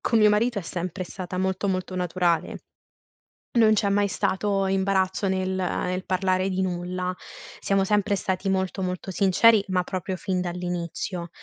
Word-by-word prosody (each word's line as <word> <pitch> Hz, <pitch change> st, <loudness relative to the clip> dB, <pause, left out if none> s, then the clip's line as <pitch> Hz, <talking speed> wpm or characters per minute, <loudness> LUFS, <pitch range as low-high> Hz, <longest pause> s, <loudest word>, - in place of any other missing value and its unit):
con 230 Hz, -, +2 dB
mio 210 Hz, -1 st, +6 dB
marito 215 Hz, +2 st, +2 dB
è 195 Hz, -, -4 dB
sempre 180 Hz, +2 st, -4 dB
stata 180 Hz, 0 st, -7 dB
molto, 190 Hz, +1 st, -1 dB
molto 185 Hz, 0 st, -2 dB
naturale, 175 Hz, -2 st, 0 dB, 1.0 s
non 220 Hz, -1 st, +6 dB
c'è 200 Hz, -1 st, +1 dB
mai 200 Hz, 0 st, +2 dB
stato 195 Hz, 0 st, 0 dB
imbarazzo 190 Hz, 0 st, +1 dB
nel 190 Hz, 0 st, 0 dB
nel 185 Hz, 0 st, -2 dB
parlare 185 Hz, 0 st, +1 dB
di 190 Hz, 0 st, -1 dB
nulla. 180 Hz, 0 st, -2 dB, 0.5 s
Siamo 195 Hz, -1 st, +2 dB
sempre 205 Hz, 0 st, +1 dB
stati 190 Hz, 0 st, -2 dB
molto, 190 Hz, 0 st, -1 dB
molto 185 Hz, +1 st, -3 dB
sinceri, 200 Hz, +3 st, +5 dB
ma 185 Hz, -1 st, +1 dB
proprio 185 Hz, +1 st, -3 dB
fin 185 Hz, +1 st, -2 dB
dall'inizio 175 Hz, 0 st, -4 dB
190 Hz, 150 wpm, -25 LUFS, 180-195 Hz, 1.0 s, mio